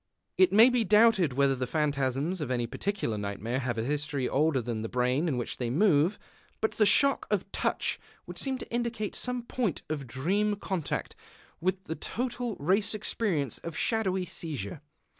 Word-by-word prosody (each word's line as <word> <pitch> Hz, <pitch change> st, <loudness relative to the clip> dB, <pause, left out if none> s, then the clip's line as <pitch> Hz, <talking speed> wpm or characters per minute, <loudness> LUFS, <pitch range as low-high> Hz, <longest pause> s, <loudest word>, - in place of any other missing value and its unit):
It 370 Hz, -, +5 dB
may 225 Hz, +5 st, +7 dB
be 245 Hz, -2 st, +2 dB
doubted 210 Hz, -, +4 dB
whether 140 Hz, +1 st, +3 dB
the 130 Hz, -1 st, -3 dB
phantasms 145 Hz, +4 st, 0 dB
of 145 Hz, -, -3 dB
any 120 Hz, -2 st, 0 dB
particular 120 Hz, -, -2 dB
nightmare 105 Hz, +5 st, -3 dB
have 120 Hz, -3 st, -2 dB
a 110 Hz, -, 0 dB
history 145 Hz, 0 st, -1 dB
older 150 Hz, -1 st, +2 dB
than 115 Hz, -2 st, -3 dB
the 110 Hz, -, -4 dB
brain 125 Hz, +6 st, +1 dB
in 140 Hz, -6 st, 0 dB
which 120 Hz, -, -3 dB
they 120 Hz, -2 st, -2 dB
move. 165 Hz, -, +3 dB, 0.4 s
But 220 Hz, -, +1 dB
the 210 Hz, -, +3 dB
shock 275 Hz, +7 st, +4 dB
of -, -, +2 dB
the -, -, -35 dB
touch -, -, -1 dB, 0.3 s
would -, -, -8 dB
seem 265 Hz, -1 st, -1 dB
to -, -, -10 dB
indicate 235 Hz, -3 st, -2 dB
some 250 Hz, -1 st, -2 dB
point 235 Hz, -, -2 dB
of 145 Hz, -4 st, -3 dB
dream 195 Hz, -, 0 dB
contact 190 Hz, -5 st, -3 dB, 0.4 s
with 185 Hz, +2 st, -1 dB
the 160 Hz, -, -4 dB
total 240 Hz, +3 st, -3 dB
race 195 Hz, +8 st, +2 dB
experience 185 Hz, -, -1 dB
of 165 Hz, -1 st, -7 dB
shadowy 190 Hz, -5 st, 0 dB
seizure. 150 Hz, -, -5 dB
165 Hz, 180 wpm, -29 LUFS, 130-210 Hz, 0.4 s, may